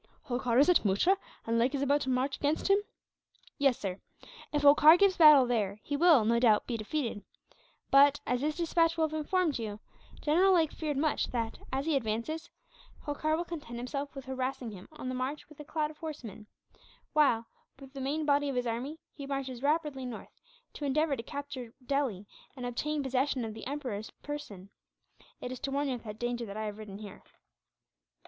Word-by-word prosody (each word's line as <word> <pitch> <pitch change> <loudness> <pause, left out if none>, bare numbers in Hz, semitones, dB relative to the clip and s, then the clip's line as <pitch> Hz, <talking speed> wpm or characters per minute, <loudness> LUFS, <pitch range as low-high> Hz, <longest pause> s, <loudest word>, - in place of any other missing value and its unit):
"Holkar 245 -2 -1
is 280 - +6
at 360 - +5
Muttra, 210 - +3 0.3
and 230 0 +1
Lake 255 +5 +2
is 280 - -1
about 285 +1 +2
to 265 - -2
march 260 +2 0
against 300 +6 0
him?" 400 - +6 0.8
"Yes, 275 -3 +3
sir. 190 -1 -4 0.5
If 295 -1 0
Holkar 295 +3 +8
gives 395 0 +4
battle 300 -5 +8
there 215 -4 -1
he 290 - -3
will, 305 -7 +5
no 235 +1 +3
doubt, 220 -4 +4
be 240 - -3
defeated 225 -1 -3 0.7
but, 280 +1 +6
as 250 0 0
this 300 +2 -1
despatch 335 -1 +2
will 320 -1 +3
have 310 - -10
informed 315 -1 0
you, 215 -2 -5 0.4
General 360 +6 +4
Lake 320 -3 +3
feared 300 -3 -3
much 305 +2 +1
that, 230 -2 -3
as 270 +2 -1
he 320 -2 +1
advances, 270 +8 -2 0.5
Holkar 310 +2 -1
will 345 - -2
content 295 -9 -7
himself 275 +4 -4
with 270 - -7
harassing 260 -2 -3
him 190 -2 -11
on 305 -4 -8
the 255 - -2
march 260 +4 -3
with 305 0 -17
a - - -6
cloud 305 0 -2
of 305 - -18
horsemen 230 - -8 0.7
while, 275 -7 +3 0.3
with 270 -1 -13
the 275 - -6
main 295 +4 -1
body 285 0 +2
of 270 - -3
his 250 0 0
army, 245 +7 -3 0.2
he 280 -2 -8
marches 265 -3 -4
rapidly 295 -2 0
north, 245 -3 -7 0.4
to - - -8
endeavour 290 +1 +1
to 230 - -5
recapture 260 -2 -7
Delhi 255 -8 -1 0.3
and 250 - -5
obtain 290 +5 -2
possession 265 -1 0
of 220 - -5
the 225 - -8
Emperor's 250 -7 -4
person. 205 -10 -7 0.7
It 250 - -5
is 255 - -6
to 275 - -3
warn 280 +1 0
you - - 0
of 245 - -6
that 210 -1 -7
danger 240 0 -3
that 200 +1 -7
I 215 - -3
have 210 0 -5
ridden 205 -2 -8
here." 205 -2 -10
275 Hz, 195 wpm, -30 LUFS, 235-300 Hz, 0.8 s, Holkar